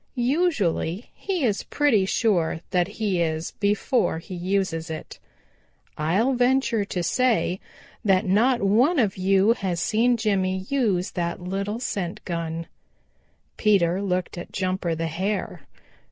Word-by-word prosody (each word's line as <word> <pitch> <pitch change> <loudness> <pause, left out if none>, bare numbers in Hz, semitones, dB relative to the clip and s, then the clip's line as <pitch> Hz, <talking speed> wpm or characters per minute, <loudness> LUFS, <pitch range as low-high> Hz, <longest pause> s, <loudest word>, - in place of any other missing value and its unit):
Usually 240 - 0
he 370 -6 -3
is 210 -5 +1
pretty 230 -10 +2
sure 175 -8 +1
that 180 -2 +2
he 205 -4 -1
is 160 0 -1
before 210 - +1
he 165 +3 -9
uses 180 -2 -1
it. 155 -1 -7 0.8
I'll 190 - +1
venture 245 -3 +2
to 180 -3 -3
say 230 -3 +1 0.4
that 195 -1 +3
not 225 +5 +3
one 245 - +3
of 210 -7 +2
you 195 +3 +3
has 185 -6 -2
seen 235 +5 +2
Jimmy 190 -4 0
use 210 -10 +1
that 170 -1 -2
little 195 +4 -3
scent 190 -8 -4
gun." 165 -1 -3 0.9
Peter 190 -4 +3
looked 180 -2 -2
at - - -9
Jumper 185 -3 -1
the 165 +1 -2
Hare. 190 +6 -3
195 Hz, 130 wpm, -24 LUFS, 175-230 Hz, 0.9 s, that